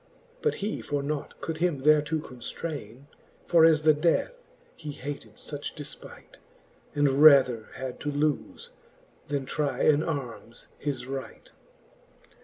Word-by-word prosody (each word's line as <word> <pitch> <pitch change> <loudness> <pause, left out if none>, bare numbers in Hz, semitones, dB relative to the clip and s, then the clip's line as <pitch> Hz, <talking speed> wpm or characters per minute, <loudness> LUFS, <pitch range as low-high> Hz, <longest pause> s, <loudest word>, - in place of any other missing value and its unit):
But 455 - +1
he 215 - -2
for 145 -1 -2
nought 150 0 -4
could 160 -1 -3
him 160 -5 0
thereto 150 +1 +4
conftraine. 130 -2 -7 0.4
For 170 -2 +5
as 155 -2 +5
the 155 0 +6
death 170 - +1 0.4
he 150 -2 -7
hated 145 +1 -7
fuch - - -7
defpight, - - -9 0.6
And 145 -1 +3
rather 130 -7 +7
had 130 -2 -6
to 145 - -2
lofe, 145 0 -1 0.6
then 140 -2 -2
trie 140 -2 -1
in 150 -1 +5
armes 125 -7 -5
his 135 -4 -3
right. 135 - -7
145 Hz, 130 wpm, -27 LUFS, 135-155 Hz, 0.6 s, rather